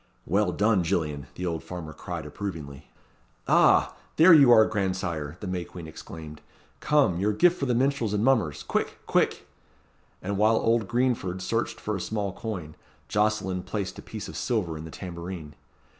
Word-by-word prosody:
"Well 100 +6 +1
done, 105 -3 +2
Gillian," 75 -6 -1
the 90 - -4
old 85 -2 -2
farmer 85 -4 -7
cried 80 +1 -6
approvingly. 75 -5 -7 0.6
"Ah! - - +5 0.3
are 165 +2 +9
you 145 -4 +8
there, 115 -2 +7
grandsire!" 90 -7 -2
the - - -5
May 90 -1 -2
Queen 85 -1 -10
exclaimed. 80 -1 -10 0.4
"Come! 145 - +2
your 105 +2 +1
gift 175 - +3
for 140 - -1
the 125 - +1
minstrels 130 -3 +1
and 105 0 0
mummers 110 - +2
quick! - - -2
quick!" - - +1 0.7
And 100 +1 -3
while 110 +2 +4
old 115 -1 +2
Greenford 120 -7 0
searched 115 +4 -2
for 105 - -3
a 95 - -4
small 100 -2 -2
coin, 90 -10 -6 0.4
Jocelyn 105 -3 0
placed 100 0 -4
a - - -7
piece - - -7
of - - -9
silver 100 -10 -1
in 80 +1 -7
the - - -8
tambourine. 85 -3 -7
95 Hz, 170 wpm, -26 LUFS, 85-110 Hz, 0.7 s, are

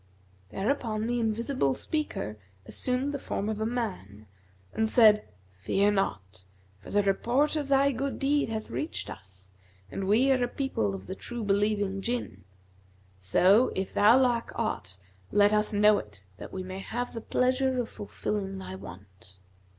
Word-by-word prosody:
Thereupon 220 - -1
the 240 +1 0
Invisible 225 - 0
Speaker 200 - -3 0.3
assumed 255 - -1
the 285 - -3
form 200 - -3
of 215 -1 -3
a 220 - +1
man 185 - -4 0.5
and 220 0 +1
said, 215 -3 +5 0.3
'Fear 200 - +2
not; 95 - -2 0.4
for - - -13
the 205 0 +2
report 240 +10 +1
of 295 -2 -2
thy 280 0 +4
good 270 +2 -3
deed 285 -1 +1
hath 220 -1 -4
reached 305 - -4
us, 95 0 -13 0.4
and 195 - -3
we 240 +7 +4
are 255 -2 +3
a - - +1
people 110 - -2
of 95 - -9
the - - -5
true 240 +4 -6
believing 200 -1 +1
Jinn. 235 - -4 0.7
So, 185 - +4
if 190 0 -3
thou 215 +4 +6
lack 245 -3 +1
aught, 105 - -3 0.3
let 205 0 +4
us 210 +1 +2
know 210 0 +5
it 100 -2 -12
that - - -9
we 185 - -5
may 185 +1 -6
have 240 +5 -4
the 230 - -5
pleasure 255 +2 +1
of 240 - -1
fulfilling 200 -1 -4
thy 190 - -7
want.' 95 0 -11
210 Hz, 160 wpm, -28 LUFS, 185-245 Hz, 0.7 s, thou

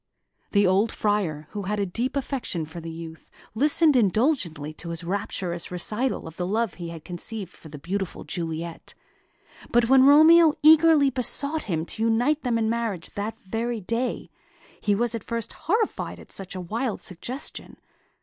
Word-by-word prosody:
The 200 -1 +4
old 195 +4 +3
Friar, 180 -8 -1
who 205 - -4
had 210 +2 -1
a 200 - +1
deep 240 +9 -2
affection 255 - -3
for 160 +2 -9
the 165 - -7
youth, 165 0 -9 0.2
listened 295 +5 +3
indulgently 195 - +1
to 170 +2 -9
his 170 +1 -4
rapturous 180 -1 -3
recital 210 +8 -1
of 160 0 -10
the 180 - -2
love 220 0 0
he 170 -2 -7
had 165 -2 -9
conceived 185 +2 -6
for 160 - -14
the 150 - -8
beautiful 190 +5 -4
Juliet; 165 -1 -5 0.8
but 235 0 +3
when 265 -1 +7
Romeo 315 +2 +7
eagerly 310 -2 +7
besought 280 +4 -1
him 165 -5 -1
to 220 - -7
unite 240 +7 +2
them 245 -3 0
in 225 -1 +1
marriage 225 -6 -2
that 205 +2 -4
very 230 +4 -2
day, 230 +6 -2 0.5
he 205 - +2
was 235 +2 0
at 230 -3 -4
first 230 -2 -4
horrified 435 +6 -1
at - - -14
such 195 -1 -7
a 185 - -4
wild 225 +6 -3
suggestion. 240 - -5
210 Hz, 170 wpm, -25 LUFS, 175-250 Hz, 0.8 s, when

